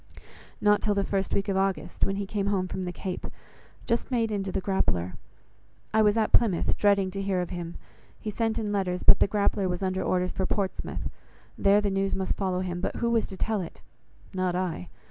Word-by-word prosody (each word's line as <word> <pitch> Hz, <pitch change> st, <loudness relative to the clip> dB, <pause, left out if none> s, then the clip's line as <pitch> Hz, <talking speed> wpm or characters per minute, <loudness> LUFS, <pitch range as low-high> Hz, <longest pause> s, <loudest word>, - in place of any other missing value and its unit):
"Not 210 Hz, 0 st, +4 dB
till 210 Hz, -2 st, +1 dB
the 200 Hz, -, +2 dB
first 195 Hz, -1 st, -1 dB
week 200 Hz, +1 st, 0 dB
of 195 Hz, -, 0 dB
August, 195 Hz, 0 st, 0 dB
when 195 Hz, -, -1 dB
he 200 Hz, 0 st, -2 dB
came 200 Hz, 0 st, -2 dB
home 190 Hz, -2 st, +1 dB
from 185 Hz, 0 st, -4 dB
the 180 Hz, -, -2 dB
Cape, 180 Hz, 0 st, -5 dB, 0.6 s
just 235 Hz, 0 st, 0 dB
made 230 Hz, -4 st, +1 dB
into 195 Hz, -2 st, -2 dB
the -, -, 0 dB
Grappler. 90 Hz, -, 0 dB, 0.8 s
I 220 Hz, -, +5 dB
was 210 Hz, 0 st, +4 dB
at 220 Hz, -, +2 dB
Plymouth 210 Hz, -8 st, +3 dB
dreading 200 Hz, -2 st, +3 dB
to 195 Hz, +1 st, -3 dB
hear 195 Hz, -2 st, 0 dB
of 180 Hz, -, -3 dB
him; 175 Hz, -1 st, -5 dB, 0.4 s
he 215 Hz, -, -4 dB
sent 225 Hz, +1 st, 0 dB
in 215 Hz, -2 st, -1 dB
letters, 185 Hz, -3 st, -1 dB
but -, -, +7 dB
the -, -, +5 dB
Grappler 200 Hz, -1 st, +1 dB
was 180 Hz, +2 st, -2 dB
under 185 Hz, 0 st, 0 dB
orders 180 Hz, 0 st, +1 dB
for 190 Hz, -, -1 dB
Portsmouth. 195 Hz, -2 st, -2 dB, 0.5 s
There 200 Hz, +1 st, +4 dB
the 205 Hz, -1 st, 0 dB
news 195 Hz, 0 st, 0 dB
must 190 Hz, 0 st, -1 dB
follow 185 Hz, -2 st, -1 dB
him, 175 Hz, -1 st, -3 dB
but -, -, -2 dB
who 235 Hz, 0 st, 0 dB
was 230 Hz, -1 st, +2 dB
to 190 Hz, -, -8 dB
tell 215 Hz, -1 st, 0 dB
it? 170 Hz, -, -8 dB, 0.5 s
not 185 Hz, -1 st, 0 dB
I. 180 Hz, -1 st, -2 dB
195 Hz, 215 wpm, -27 LUFS, 185-205 Hz, 0.8 s, but